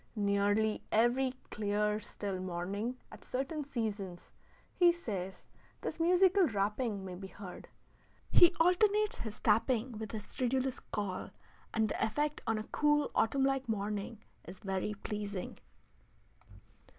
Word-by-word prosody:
Nearly 205 +1 +2
every 250 +4 +3 0.2
clear, 210 0 0
still 200 -2 -5
morning 190 +7 -3
at - - -12
certain 275 +4 -2
seasons, 210 -9 -4 0.4
he 350 -1 +6
says, 195 - -5 0.4
this - - -4
musical 365 +2 +5
rapping 210 -1 -1
may 185 - -6
be 190 +2 -7
heard. 190 -1 -9 0.6
"He 345 - +7
alternates 415 +5 +3
his 215 -2 -5
tapping 230 +3 +2
with 220 -2 -5
his 215 -2 -5
stridulous 260 +1 -1
call, 200 -3 -3 0.4
and 220 -1 +2
the - - -1
effect 295 +6 0
on 225 - +2
a 215 - -3
cool, 295 +4 +2
autumn 270 +4 +2
like 270 -2 0
morning 210 +1 -3 0.2
is 185 +2 -10
very 195 +1 -2
pleasing." 205 -3 -4
220 Hz, 125 wpm, -33 LUFS, 200-270 Hz, 0.6 s, He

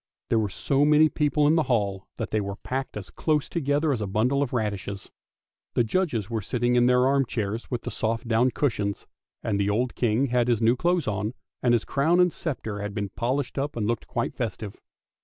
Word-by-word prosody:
There 115 - +3
were 105 -2 0
so 135 +8 +1
many 150 +1 +5
people 150 0 +1
in 150 - +5
the 165 - +4
hall 100 -5 0
that - - -4
they 110 - +1
were 100 0 -4
packed 130 +2 -4
as 100 - -8
close 150 -2 0
together 145 -1 +1
as 115 - -3
a 105 - -2
bundle 120 +8 +1
of 140 - -1
radishes. 100 -4 -3 0.6
The 120 - +4
judges 120 - 0
were 115 -1 -2
sitting 120 +4 0
in 120 0 +4
their 125 0 +4
arm 135 0 +3
chairs 110 -2 -3
with 120 -2 -3
the - - -4
soft 115 +2 -2
down 115 +3 +3
cushions; 105 -8 -1 0.4
and 100 -2 0
the 100 0 +1
old 120 +4 0
King 120 +2 +1
had 120 0 +2
his 120 -3 +2
new 115 +1 +4
clothes 175 +1 +1
on, 105 +3 -2 0.3
and 120 -1 +4
his 115 - -1
crown 160 +6 +2
and 180 -2 +4
sceptre 110 -9 -4
had 105 -1 -5
been 100 -2 -2
polished 130 +6 -2
up 145 +2 -2
and 110 -3 -1
looked 115 +1 -2
quite - - -2
festive. 105 -1 -5
120 Hz, 215 wpm, -26 LUFS, 105-140 Hz, 0.6 s, many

